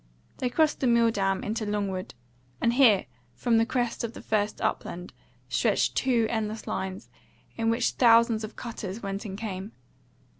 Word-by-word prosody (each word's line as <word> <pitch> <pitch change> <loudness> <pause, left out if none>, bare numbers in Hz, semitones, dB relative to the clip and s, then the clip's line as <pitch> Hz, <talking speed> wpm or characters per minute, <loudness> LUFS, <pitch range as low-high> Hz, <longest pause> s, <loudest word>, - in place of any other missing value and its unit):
They 250 - 0
crossed 310 +4 +2
the 260 - +1
Milldam 225 -5 +2
into 220 +1 -2
Longwood; 200 -5 -3 0.4
and 235 - +2
here, 235 -7 +5 0.3
from 225 - +2
the 225 - +2
crest 245 -2 -1
of 230 0 -3
the - - -9
first 210 -1 0
upland, 175 +1 -3 0.3
stretched - - +1
two 245 -4 +2
endless 220 -1 -3
lines, 190 +2 -4 0.4
in 225 -1 0
which 230 +1 +1
thousands 230 -2 +4
of 215 - -7
cutters 220 -3 -6
went 195 +2 -4
and 195 -2 -5
came. 205 -1 -5
225 Hz, 155 wpm, -27 LUFS, 200-235 Hz, 0.4 s, here